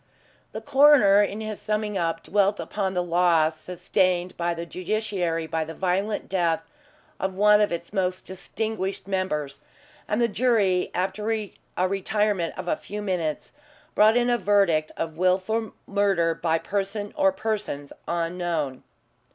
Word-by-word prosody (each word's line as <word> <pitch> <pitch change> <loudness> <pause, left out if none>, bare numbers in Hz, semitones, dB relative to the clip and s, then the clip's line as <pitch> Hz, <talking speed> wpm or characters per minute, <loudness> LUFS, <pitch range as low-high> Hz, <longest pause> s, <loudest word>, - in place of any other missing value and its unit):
The - - -6
coroner, 270 -8 +6
in 205 +1 -1
his 215 -1 -5
summing 210 -1 -2
up, 165 -2 -1
dwelt 205 0 +1
upon 190 -2 -3
the 180 - +1
loss 165 -2 +2
sustained 180 0 0
by 170 0 -1
the 170 0 -5
Judiciary 185 -3 -2
by 160 0 -2
the 160 +1 -8
violent 195 +3 -1
death 170 -4 0 0.6
of 190 0 -2
one 210 +1 +5
of 210 - +2
its 170 +2 -5
most 185 -2 -1
distinguished 195 +1 -4
members, 150 -8 -2 0.5
and 210 - 0
the 235 - +3
jury, 210 -6 +2
after 195 +4 -1
a 215 -3 -2 0.4
retirement 195 -2 -1
of 185 - -6
a - - +2
few 210 +1 -7
minutes, 170 -6 -2 0.4
brought 215 +2 +5
in 245 0 +2
a 240 - +2
verdict 190 -6 +2
of 160 -1 -4
wilful 190 +5 +1
murder 195 -5 +1
by 165 0 0
some - - -10
person 205 +1 -3
or 195 - +3
persons 190 -9 -4
unknown. 170 -5 -2
190 Hz, 150 wpm, -25 LUFS, 170-210 Hz, 0.6 s, coroner